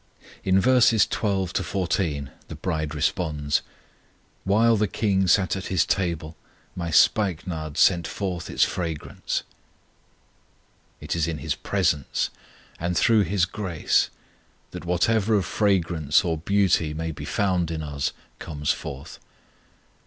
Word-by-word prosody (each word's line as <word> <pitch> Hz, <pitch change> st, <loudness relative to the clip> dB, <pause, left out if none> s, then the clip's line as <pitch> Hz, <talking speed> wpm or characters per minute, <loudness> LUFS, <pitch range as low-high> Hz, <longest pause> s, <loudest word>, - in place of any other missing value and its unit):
In 95 Hz, 0 st, +3 dB
verses 120 Hz, 0 st, +5 dB
12 95 Hz, -4 st, -1 dB
14 85 Hz, -7 st, -1 dB, 0.2 s
the -, -, -7 dB
bride 80 Hz, -2 st, -3 dB
responds: 75 Hz, -2 st, 0 dB, 0.8 s
While 110 Hz, +4 st, +4 dB
the 105 Hz, 0 st, +1 dB
King 95 Hz, -2 st, +1 dB
sat 95 Hz, +1 st, +3 dB
at 95 Hz, -, -5 dB
His 95 Hz, -3 st, +2 dB
table 85 Hz, -4 st, -2 dB, 0.4 s
My 85 Hz, -2 st, -3 dB
spikenard 80 Hz, -, +1 dB
sent 85 Hz, -3 st, +4 dB
forth 95 Hz, -4 st, -4 dB
its -, -, +2 dB
fragrance. 80 Hz, -4 st, -3 dB, 1.6 s
It -, -, -3 dB
is 85 Hz, -1 st, 0 dB
in 80 Hz, -2 st, -3 dB
His 75 Hz, -2 st, -2 dB
presence 80 Hz, -9 st, -1 dB, 0.5 s
and 85 Hz, +1 st, -1 dB
through 110 Hz, -3 st, +4 dB
His 90 Hz, 0 st, +1 dB
grace 90 Hz, -4 st, 0 dB, 0.6 s
that -, -, -8 dB
whatever 110 Hz, +5 st, +2 dB
of 100 Hz, -4 st, +1 dB
fragrance 90 Hz, -5 st, +1 dB
or 85 Hz, -2 st, 0 dB
beauty 85 Hz, -2 st, +1 dB
may 80 Hz, +1 st, -3 dB
be 75 Hz, -, -8 dB
found 90 Hz, -4 st, 0 dB
in 80 Hz, -1 st, -3 dB
us 70 Hz, -2 st, -2 dB, 0.3 s
comes 75 Hz, 0 st, -2 dB
forth. 70 Hz, -5 st, -8 dB
90 Hz, 125 wpm, -24 LUFS, 80-95 Hz, 1.6 s, verses